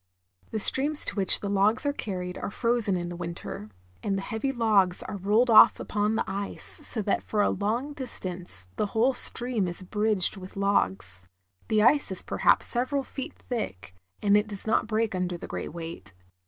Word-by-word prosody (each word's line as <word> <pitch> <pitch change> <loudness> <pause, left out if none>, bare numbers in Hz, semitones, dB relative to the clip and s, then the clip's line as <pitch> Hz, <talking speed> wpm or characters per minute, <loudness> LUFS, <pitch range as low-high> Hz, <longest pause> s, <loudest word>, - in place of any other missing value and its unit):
The - - -3
streams 285 +7 +3
to - - -5
which 195 -3 +1
the 205 - -3
logs 200 +6 +1
are 285 - +1
carried 180 -8 -5
are - - -4
frozen 230 -3 0
in 175 0 -4
the 175 - -6
winter, 170 -11 -7 0.3
and 195 -2 -1
the 195 - -4
heavy 225 +6 -2
logs 210 -7 +4
are 200 - -6
rolled 215 +6 +2
off 215 - +8
upon 210 +1 -1
the - - 0
ice, 200 +1 -4
so 220 - 0
that 200 - 0
for 210 -1 0
a - - +2
long 230 +9 -2
distance 180 - -6
the 210 - 0
whole 250 +4 +3
stream 240 -5 +2
is 175 +2 -6
bridged 210 0 +2
with 185 +1 -10
logs. 95 - 0 0.5
The 215 -1 +2
ice 280 0 +3
is 190 - -5
perhaps - - +2
several 260 +3 +2
feet 265 0 -7
thick, 95 - -5 0.3
and 205 0 +4
it 210 +1 +2
does 205 -2 -2
not 220 0 +1
break 225 -1 0
under 180 -1 -2
the - - -8
great - - -6
weight. 165 - -8
205 Hz, 190 wpm, -27 LUFS, 180-230 Hz, 0.5 s, off